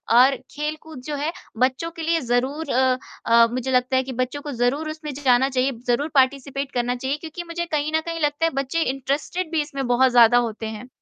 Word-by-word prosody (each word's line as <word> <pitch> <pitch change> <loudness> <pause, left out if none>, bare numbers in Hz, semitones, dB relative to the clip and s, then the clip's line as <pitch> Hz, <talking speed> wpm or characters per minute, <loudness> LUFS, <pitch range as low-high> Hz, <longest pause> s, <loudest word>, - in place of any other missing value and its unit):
और 260 +3 +6 0.2
खेलकूद 305 -1 -5
जो 300 - -3
है, 295 +3 -2 0.3
बच्चों 260 +6 +1
के 330 - -9
लिए 330 +1 +2
ज़रूर 260 +6 -1
अ 255 0 +3 0.3
अ, 230 0 +6
मुझे 255 +1 -2
लगता 255 +1 +2
है 260 - +3
कि 260 0 -6
बच्चों 255 +4 -2
को 295 - -6
ज़रूर 270 +5 0
उसमें 310 -2 -6
जाना 265 -1 +3
चाहिए, 260 +1 +1 0.2
ज़रूर 280 +6 +1
पार्टिसिपेट 275 +1 +1
करना 245 0 -1
चाहिए, 265 +4 -2
क्योंकि 325 +2 -7
मुझे 345 0 -4
कहीं 305 -2 -1
न 320 - +2
कहीं 335 -1 -4
लगता 295 +2 +1
है 330 - +1
बच्चे 275 +5 -2
इंटरेस्टेड 285 +6 -2
भी 320 - +1
इसमें 275 -2 -4
बहुत 255 +1 +4
ज़्यादा 240 0 +6
होते 225 -2 -1
हैं। 220 +3 -7
275 Hz, 210 wpm, -23 LUFS, 250-305 Hz, 0.3 s, और